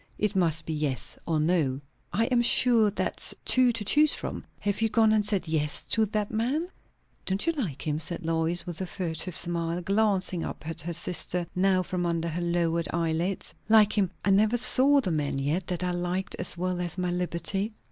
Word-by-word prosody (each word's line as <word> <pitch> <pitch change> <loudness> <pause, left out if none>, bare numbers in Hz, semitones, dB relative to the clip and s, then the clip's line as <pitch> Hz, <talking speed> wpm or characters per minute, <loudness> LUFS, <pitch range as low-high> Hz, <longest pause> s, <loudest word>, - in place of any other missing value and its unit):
It 210 -1 0
must 165 -4 +2
be 160 - -3
yes 150 -4 -2
or 160 -2 +1
no." 150 -5 +1 0.3
"I 225 - +1
am 240 - +4
sure 235 -2 +5
that's 205 - -1
two 255 -1 +5
to 225 -3 -3
choose 300 +7 +4
from. - - -6 0.2
Have 205 +1 -1
you 225 - +2
gone 220 0 +4
and 215 -1 +3
said 200 -4 -1
yes 150 -2 -1
to 220 -1 +3
that 210 0 -2
man?" 255 +9 0 0.6
"Don't 190 +6 0
you 335 - +2
like 195 - -4
him?" 150 -1 -1
said 170 0 -4
Lois, 165 +2 0
with 175 0 -6
a 185 - -3
furtive 170 -1 -2
smile, 170 0 -1
glancing 195 -3 0
up 155 - -7
at 165 - -4
her 170 +3 -4
sister 175 +1 -1
now 185 0 +2
from 180 0 -2
under 170 -1 -1
lowered 170 -1 0
eyelids. 170 +3 -1 0.2
"Like 215 -1 +5
him! 200 -4 +2 0.2
I 200 - +3
never 215 +4 +3
saw 270 +3 +3
the 185 - -2
man 150 -3 -1
yet, 150 +7 -1
that 180 -1 -3
I 180 - 0
liked 180 +2 -2
as 180 -1 +1
well 180 0 -2
as 175 0 -3
my 180 -1 -1
liberty." 180 +4 -2
180 Hz, 200 wpm, -27 LUFS, 165-210 Hz, 0.6 s, sure